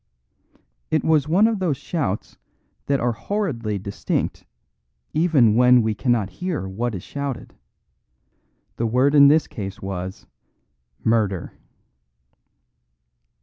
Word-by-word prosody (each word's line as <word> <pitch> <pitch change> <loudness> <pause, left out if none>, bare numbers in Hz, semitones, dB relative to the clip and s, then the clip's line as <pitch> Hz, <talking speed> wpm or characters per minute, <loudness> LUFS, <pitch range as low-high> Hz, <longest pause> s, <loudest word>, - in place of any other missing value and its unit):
It 155 - +1
was 155 -3 +2
one 185 +7 +4
of 225 -3 -1
those 170 -7 0
shouts 130 - -4 0.5
that 140 -1 +1
are 120 0 +1
horridly 120 - -3
distinct 100 +1 -3 0.7
even 150 -9 +4
when 125 +1 +5
we 110 0 0
cannot 115 -3 0
hear 180 - -4
what 110 +4 -3
is 90 - -7
shouted. 140 -3 -5 1.2
The 115 - 0
word 130 +5 +2
in 140 -1 +8
this 150 +1 +4
case 100 -1 -7
was 95 -1 -6 0.8
"Murder!" 105 -5 0
120 Hz, 110 wpm, -22 LUFS, 105-150 Hz, 1.2 s, in